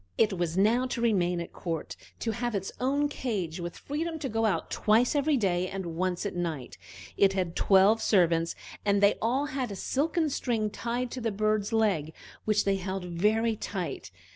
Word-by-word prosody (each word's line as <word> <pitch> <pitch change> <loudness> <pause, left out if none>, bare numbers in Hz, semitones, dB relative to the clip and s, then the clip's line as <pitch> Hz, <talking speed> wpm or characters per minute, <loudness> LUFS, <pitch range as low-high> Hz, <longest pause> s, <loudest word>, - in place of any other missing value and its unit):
It 215 -3 +3
was 175 -1 -2
now 230 +6 +3
to 245 - -3
remain 180 -7 +2
at 170 - -6
court, 165 -3 -4 0.3
to 225 - 0
have 240 0 -2
its 195 -1 -3
own 280 +3 +1
cage, 200 - -3
with 175 0 -5
freedom 320 +3 -3
to 290 -4 -4
go 225 0 +1
out 205 - -1
twice 225 +3 +3
every 290 0 +2
day 185 -5 +1
and 185 -3 -5
once 180 +2 -1
at 200 - -3
night. 165 -7 -3 0.4
It 195 -1 +4
had 180 -3 -2
twelve 200 +3 +5
servants, 170 -4 +2 0.3
and 200 -1 +3
they 200 0 +4
all 255 +6 +1
had 265 -4 -3
a - - -4
silken 305 - 0
string 225 -5 -1
tied 240 +2 -3
to 255 - -5
the 225 -1 0
bird's 215 +1 0
leg 195 -9 +1 0.3
which 215 -1 +2
they 195 -1 +2
held 190 0 -4
very 215 +6 +1
tight. 190 -5 -5
210 Hz, 190 wpm, -28 LUFS, 180-240 Hz, 0.4 s, twelve